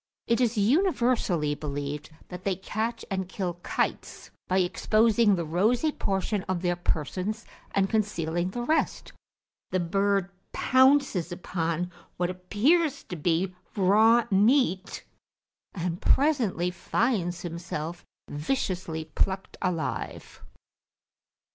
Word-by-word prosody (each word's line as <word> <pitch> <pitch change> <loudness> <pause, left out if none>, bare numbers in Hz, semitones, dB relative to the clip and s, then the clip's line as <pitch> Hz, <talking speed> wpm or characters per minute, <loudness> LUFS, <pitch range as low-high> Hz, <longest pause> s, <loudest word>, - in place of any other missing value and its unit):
It 235 +1 +1
is 240 -2 +1
universally 235 - +2
believed 145 0 -4 0.2
that 180 0 -8
they 195 -2 0
catch 220 +5 -3
and 190 -1 -2
kill 180 -3 -3
kites, - - -3 0.2
by 185 - +1
exposing 215 +3 +3
the 170 -2 -2
rosy 220 - +2
portion 195 -3 -1
of 185 -1 -1
their 175 -1 +1
persons 185 +6 -2 0.3
and 195 -1 +3
concealing 175 -5 -1
the 240 +5 -4
rest; 315 +6 0 0.6
the 185 - 0
bird 195 +2 +1 0.2
pounces 260 - +3
upon 175 -1 -2 0.3
what 175 0 0
appears 265 - +1
to 180 - -4
be 175 +3 0 0.2
raw 220 +5 +5
meat, 200 -2 +2 0.7
and 175 -1 -3
presently 235 - +2
finds 180 -3 -1
himself 170 -1 -5 0.2
viciously 165 - -2
plucked 190 +5 -2
alive. 175 -5 -3
190 Hz, 110 wpm, -27 LUFS, 175-225 Hz, 0.7 s, raw